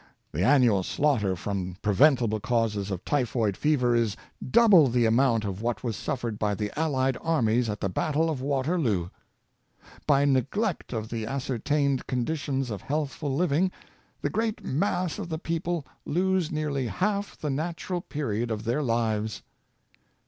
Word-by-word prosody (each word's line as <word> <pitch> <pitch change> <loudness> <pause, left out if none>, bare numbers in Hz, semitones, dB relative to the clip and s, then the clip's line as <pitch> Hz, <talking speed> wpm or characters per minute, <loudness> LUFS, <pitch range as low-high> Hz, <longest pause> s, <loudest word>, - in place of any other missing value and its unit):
The 85 - -1
annual 120 -6 +4
slaughter 105 -4 +1
from 95 -1 -4
preventable 115 0 +4
causes 115 -4 0
of 95 -2 -4
typhoid 120 -7 0
fever 130 -4 +2
is 115 -4 +1 0.3
double 190 - +6
the 120 -1 +2
amount 115 -1 +3
of 100 0 -4
what 120 +2 -2
was 115 -4 -2
suffered 115 -3 -3
by 105 -1 0
the 105 0 -3
allied 135 -4 0
armies 120 -7 +1
at 105 -1 -4
the - - +1
battle 155 - 0
of 155 -5 -2
Wat 135 -1 0
erloo! 115 - 0 1.0
By 140 -1 +4
neglect 145 - 0
of 110 -2 -3
the 110 -2 -3
ascertained 135 +1 -1
conditions 135 0 -1
of 100 -3 -5
healthful 145 -1 -2
living, 175 +3 +2 0.5
the - - 0
great 220 -1 -2
mass 180 +2 -1
of - - -5
the 160 - -2
people 165 -1 -2 0.2
lose 185 0 0
nearly 145 -4 -1
half 200 - -1
the 150 - -3
natural 170 +4 -3
period 120 -8 -3
of 110 -1 -3
their 120 +6 0
lives. 110 -4 -1
130 Hz, 150 wpm, -27 LUFS, 110-155 Hz, 1.0 s, double